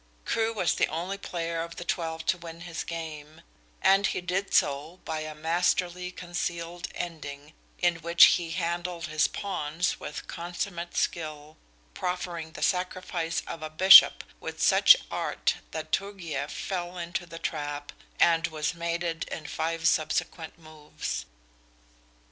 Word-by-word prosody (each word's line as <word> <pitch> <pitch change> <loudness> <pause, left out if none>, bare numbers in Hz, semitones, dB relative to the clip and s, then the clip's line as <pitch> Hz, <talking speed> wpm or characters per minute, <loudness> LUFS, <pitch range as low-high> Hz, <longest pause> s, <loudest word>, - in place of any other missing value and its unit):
Crewe 225 0 +1
was 195 -6 +1
the - - +2
only 180 +5 -4
player 165 -3 -3
of 170 0 -6
the - - -6
twelve 165 -1 -2
to 185 - +2
win 170 -1 -9
his 175 -2 -5
game, 155 -2 -7 0.4
and 195 +1 +5
he - - -1
did 185 +2 -2
so 150 +5 +1
by 160 -1 -2
a 155 0 -6
masterly 180 +3 0
concealed 175 -1 -4
ending 150 -3 -6 0.2
in 175 -1 +2
which 170 +1 +5
he 170 -2 -5
handled 170 +1 -2
his 155 +1 +2
pawns 175 -4 -2
with 150 - -6
consummate 175 0 -5
skill, 155 -2 -2 0.4
proffering 175 - -4
the - - -5
sacrifice 180 -2 -1
of 165 - -7
a 155 - -4
bishop 185 +5 +9 0.2
with - - -7
such - - +7
art - - 0
that - - -6
Turgieff 170 -8 -2
fell 180 -2 -4
into 175 +1 -4
the 165 0 -9
trap, 145 -3 -4 0.3
and 165 0 +4
was 155 0 -2
mated 170 -1 -2
in 155 - -7
five 165 +2 -1
subsequent 160 0 0
moves. 150 - -6
170 Hz, 140 wpm, -28 LUFS, 155-175 Hz, 0.4 s, bishop